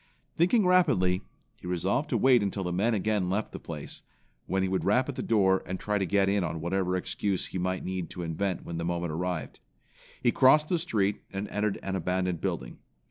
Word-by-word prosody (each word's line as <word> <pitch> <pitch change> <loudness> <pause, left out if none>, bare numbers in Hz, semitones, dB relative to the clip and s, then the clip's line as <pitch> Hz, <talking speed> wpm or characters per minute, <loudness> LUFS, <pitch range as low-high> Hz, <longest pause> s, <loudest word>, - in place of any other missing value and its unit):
Thinking 185 +5 +3
rapidly, 130 - +3 0.4
he - - -10
resolved 95 - 0
to - - +1
wait 130 -3 +5
until 100 -1 -2
the 90 -1 -2
men 110 +6 +2
again 105 -2 0
left 105 +3 -1
the - - -7
place, - - -6 0.5
when 95 0 +1
he - - +1
would 95 0 -1
rap 125 +6 +3
at 145 - -3
the - - -3
door, 95 -4 +3
and 95 +1 -4
try 105 -1 -1
to 95 - 0
get 100 +1 +3
in 100 -1 +2
on 85 -2 -3
whatever 90 +2 0
excuse 95 +1 -2
he 95 - -5
might 95 +1 -2
need 90 -3 -3
to 90 - -6
invent 90 +3 -2
when 85 -1 -4
the - - -2
moment 85 -1 -2
arrived. 80 -3 -3 0.6
He 120 - +4
crossed 150 +5 +5
the 175 - +2
street, 105 - 0
and 100 +1 -4
entered 105 -1 -1
an 95 0 -2
abandoned 90 -2 -1
building. - - -3
95 Hz, 210 wpm, -28 LUFS, 90-105 Hz, 0.6 s, wait